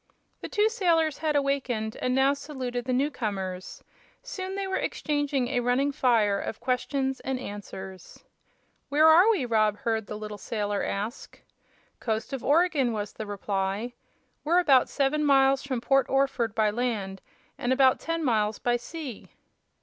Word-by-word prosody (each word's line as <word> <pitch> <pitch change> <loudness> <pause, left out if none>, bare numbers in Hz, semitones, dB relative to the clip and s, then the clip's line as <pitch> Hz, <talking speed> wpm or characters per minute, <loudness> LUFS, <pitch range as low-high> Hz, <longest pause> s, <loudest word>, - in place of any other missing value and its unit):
The - - -6
two 420 0 +3
sailors 335 - +1
had 310 -1 0
awakened 265 -6 -1
and 255 0 0
now 270 +1 +4
saluted 260 -4 -5
the 255 - -2
new 275 +4 +1
comers. 190 -7 -5 0.4
Soon 380 -6 -5
they 395 0 -2
were 380 0 -2
exchanging 290 -4 -1
a 255 -2 0
running 250 +4 +1
fire 225 -7 +2
of 220 - -5
questions 265 +1 -1
and 265 -1 -3
answers. 195 -4 -9 0.7
"Where 300 +2 +4
are 345 +7 +7
we?" 390 - +2
Rob 215 -3 +2
heard 220 -2 -2
the 210 - -5
little 210 -1 -7
sailor 205 -2 -2
ask. 210 +6 -5 0.6
"Coast 220 +3 -3
of 270 - -4
Oregon," 290 -5 +2
was 210 -1 -4
the 215 - -7
reply. 200 +3 -2 0.5
"We're 335 +4 +2
about 275 -8 +4
seven 290 +2 0
miles 270 -1 +4
from 260 -4 -3
Port 270 +2 +2
Orford 270 -5 +1
by 215 -2 +2
land 210 -5 -3 0.4
an' 245 - -1
about 260 0 +4
ten 330 0 -3
miles 215 -4 +1
by 240 0 +1
sea." 275 -1 -8
255 Hz, 155 wpm, -27 LUFS, 215-285 Hz, 0.7 s, are